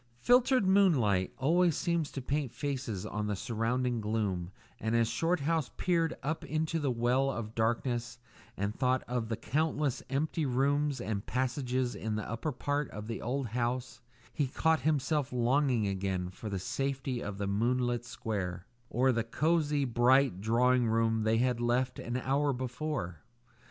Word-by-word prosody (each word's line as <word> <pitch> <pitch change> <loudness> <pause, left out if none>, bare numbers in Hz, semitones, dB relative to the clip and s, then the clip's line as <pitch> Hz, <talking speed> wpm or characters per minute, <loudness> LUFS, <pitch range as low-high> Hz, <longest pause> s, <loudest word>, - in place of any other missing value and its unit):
Filtered 250 - +4
moonlight 140 - +3
always 165 +4 +3
seems 170 -4 0
to 135 - -5
paint 140 -2 -1
faces 130 -9 -3
on 105 -1 -3
the 105 - -1
surrounding 120 +2 -1
gloom, 105 -5 -1 0.3
and 110 +1 0
as 115 -1 +3
Shorthouse 160 +2 0
peered 165 -3 +1
up 155 +3 -2
into 160 +1 -1
the 145 -3 0
well 125 +3 +2
of 115 -4 -4
darkness 120 +2 -1 0.4
and 100 +2 -1
thought 130 +1 +1
of 120 -2 -2
the 115 - -2
countless 150 -2 0
empty 155 +4 -1
rooms 140 +2 +1
and 105 -2 -3
passages 130 0 -1
in 110 -1 -3
the 110 - -3
upper 115 +7 -3
part 145 +2 -2
of 105 0 -7
the 115 +1 -5
old 125 +1 -2
house, 120 +2 -2 0.3
he 145 - 0
caught 160 +4 +2
himself 150 -2 0
longing 125 -1 +2
again 95 -2 -2
for 105 +3 -7
the 100 - -2
safety 130 +4 -2
of 105 -1 -5
the 100 - -2
moonlit 120 +4 0
square, 95 -6 -4 0.2
or 130 +2 +3
the 115 -2 0
cosy, 150 +3 +1
bright 125 -3 +3
drawing 120 +3 +3
room 115 0 +2
they 110 +1 +2
had 125 0 +1
left 125 +2 0
an 120 +1 -3
hour 140 +3 +1
before. 125 - -3
125 Hz, 155 wpm, -31 LUFS, 115-145 Hz, 0.4 s, Filtered